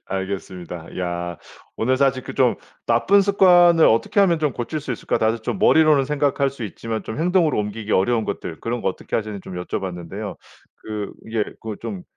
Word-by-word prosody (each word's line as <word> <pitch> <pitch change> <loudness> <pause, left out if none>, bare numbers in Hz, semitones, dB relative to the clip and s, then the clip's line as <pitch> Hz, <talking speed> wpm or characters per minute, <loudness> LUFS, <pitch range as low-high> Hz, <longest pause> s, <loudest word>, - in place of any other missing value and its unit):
알겠습니다. 95 -3 -5
야 85 -1 -3 0.4
오늘 130 +3 +1
사실 135 -1 +2
그 - - -7
좀 - - +3 0.3
'나쁜 120 +13 +4
습관을 175 -4 +5
어떻게 115 - +3
하면 175 -4 +4
좀 150 -3 0
고칠 125 +7 -4
수 135 -3 -4
있을까?' 115 - -2
다들 110 +1 +1
좀 110 - -3
머리로는 155 -8 +5
생각할 140 -1 +1
수 130 -4 -7
있지만 110 +2 -5
좀 110 - -6
행동으로 170 - +2
옮기기 105 +1 -4
어려운 110 +3 +2
것들 85 -5 -5
그런 120 +1 -3
거 - - +1
어떻게 95 - -6
하시는지 105 -2 -4
좀 95 - -9
여쭤 - - -3
봤는데요. 95 +3 -6 0.4
그 105 -2 -6
이게 110 -1 -1 0.2
그 110 -2 -6
좀 190 -3 -6
115 Hz, 385 characters per minute, -22 LUFS, 100-150 Hz, 0.4 s, 습관을